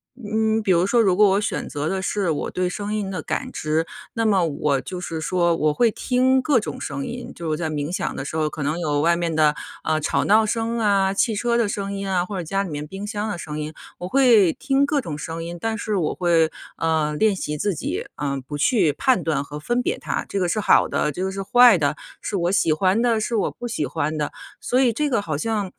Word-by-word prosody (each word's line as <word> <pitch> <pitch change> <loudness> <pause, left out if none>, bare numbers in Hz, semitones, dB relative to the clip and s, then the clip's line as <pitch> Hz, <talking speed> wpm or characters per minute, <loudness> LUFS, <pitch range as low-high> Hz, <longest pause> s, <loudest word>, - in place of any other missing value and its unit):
嗯， 220 -1 0
比 195 - +2
如 175 +1 +3
说 235 +3 +4
如 190 -4 +3
果 210 0 +6
我 200 - +2
选 210 - -2
择 145 +1 -3
的 190 0 -1
是， 190 -1 -1
我 145 - -2
对 180 0 -1
声 205 +3 -4
音 200 -2 -2
的 185 -4 -3
感 - - -3
知， 155 +2 -1 0.3
那 230 -2 -1
么 195 -5 +3
我 145 -2 0
就 180 +4 -6
是 165 -2 -4
说 170 +1 +1
我 150 -1 +2
会 235 +6 +3
听 260 +3 +2
各 270 0 +3
种 255 - -6
声 275 +1 -4
音， 245 0 -7
就 170 - -8
是 - - -1
我 155 - 0
在 160 -1 -2
冥 150 0 -3
想 185 - -2
的 - - -4
时 150 +3 -4
候 155 -1 +1
可 150 - -5
能 150 +4 -1
有 145 -4 0
外 170 +2 +3
面 170 -2 -1
的， 155 -1 +4 0.3
呃， 155 0 +1
吵 150 - 0
闹 215 +2 +4
声 230 +2 -1
啊、 200 -3 +2
汽 220 +3 +1
车 235 +3 +1
的 230 -2 +2
声 200 -1 -3
音 195 0 -4
啊， 180 -2 +1
或 195 +1 -5
者 180 - -3
家 195 +4 -1
里 195 - -6
面 150 -1 -5
冰 195 +5 -7
箱 210 0 -3
的 205 - -3
声 150 -2 -6
音。 155 +1 -5 0.2
我 180 - -5
会 230 -7 +5
听 275 0 +1
各 285 0 0
种 160 - -5
声 165 +2 -5
音， 170 +1 -6
但 225 +3 -2
是 220 -2 -2
我 160 -5 -1
会， 170 -3 +3 0.3
呃， 160 -2 0
练 215 +1 +3
习 150 -5 -4
自 200 +4 -1
己， - - -3
呃， 140 -2 -2
不 145 - -4
去 155 - +3
判 260 - +2
断 155 -4 0
和 145 +1 -8
分 240 +11 0
别 405 - -1
它， - - -3
这 200 - -2
个 180 - +1
是 215 - 0
好 - - +4
的， 150 - 0
这 180 +6 -4
个 - - -1
是 195 0 -4
坏 245 0 +7
的， 145 -2 0 0.3
是 200 - -2
我 175 0 0
喜 170 -4 +2
欢 185 +7 +2
的， 235 -2 +2
是 225 +2 -2
我 215 - 0
不 240 - -7
喜 220 -10 -2
欢 155 0 -2
的。 150 -1 -2 0.3
所 250 - +1
以 250 -3 +3
这 300 +5 0
个 230 -6 +1
好 155 -7 -3
像 205 +1 -2
190 Hz, 275 characters per minute, -22 LUFS, 160-220 Hz, 0.3 s, 坏